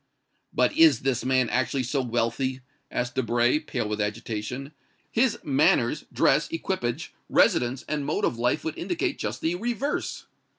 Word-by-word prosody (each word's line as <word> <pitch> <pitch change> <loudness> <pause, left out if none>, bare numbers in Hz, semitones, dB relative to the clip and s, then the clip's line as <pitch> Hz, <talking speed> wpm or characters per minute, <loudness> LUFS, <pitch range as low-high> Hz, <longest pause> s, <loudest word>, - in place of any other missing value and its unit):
"But - - +2
is 325 0 +6
this 135 -3 0
man 130 -1 +2
actually 130 +1 0
so 135 +3 0
wealthy?" 120 +2 -1 0.3
asked 125 0 -2
Debray, 120 +2 +2
pale 125 -7 -3
with 105 0 -2
agitation. 115 +5 -4 0.4
"His 235 -1 +2
manners, 280 -1 +2
dress, - - +3
equipage, 190 - -3 0.2
residence 125 +2 +3
and 150 -2 -1
mode - - 0
of 115 - -1
life 120 +1 +1
would 160 - -4
indicate 175 -1 -2
just - - -3
the 165 - +1
reverse." 240 +8 -2
130 Hz, 145 wpm, -26 LUFS, 120-170 Hz, 0.4 s, is